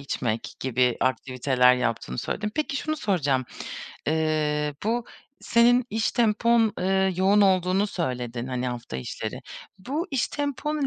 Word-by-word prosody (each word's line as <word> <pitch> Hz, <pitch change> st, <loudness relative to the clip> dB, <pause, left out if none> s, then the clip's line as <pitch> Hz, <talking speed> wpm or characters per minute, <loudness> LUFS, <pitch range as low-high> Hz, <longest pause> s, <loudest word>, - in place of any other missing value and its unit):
içmek 120 Hz, -5 st, -3 dB
gibi 125 Hz, -1 st, +1 dB
aktiviteler 130 Hz, 0 st, +3 dB
yaptığını 115 Hz, -, -2 dB
söyledin. 210 Hz, 0 st, -2 dB
Peki 300 Hz, -2 st, -1 dB
şunu 310 Hz, +3 st, -2 dB
soracağım: 145 Hz, -, 0 dB, 0.6 s
Eee, 150 Hz, -1 st, 0 dB
bu 230 Hz, +2 st, 0 dB, 0.4 s
senin 240 Hz, +1 st, +4 dB
iş 220 Hz, +1 st, 0 dB
tempon, 230 Hz, -1 st, +3 dB
eee, 190 Hz, 0 st, +2 dB
yoğun 195 Hz, +3 st, +4 dB
olduğunu 190 Hz, 0 st, +3 dB
söyledin, 125 Hz, -, -3 dB
hani, 125 Hz, -1 st, -2 dB
hafta 120 Hz, -, -5 dB
içleri. 65 Hz, -, -5 dB, 0.4 s
Bu 285 Hz, -, -3 dB
iş 270 Hz, -3 st, 0 dB
tempon 290 Hz, 0 st, -2 dB
180 Hz, 125 wpm, -25 LUFS, -, 0.6 s, senin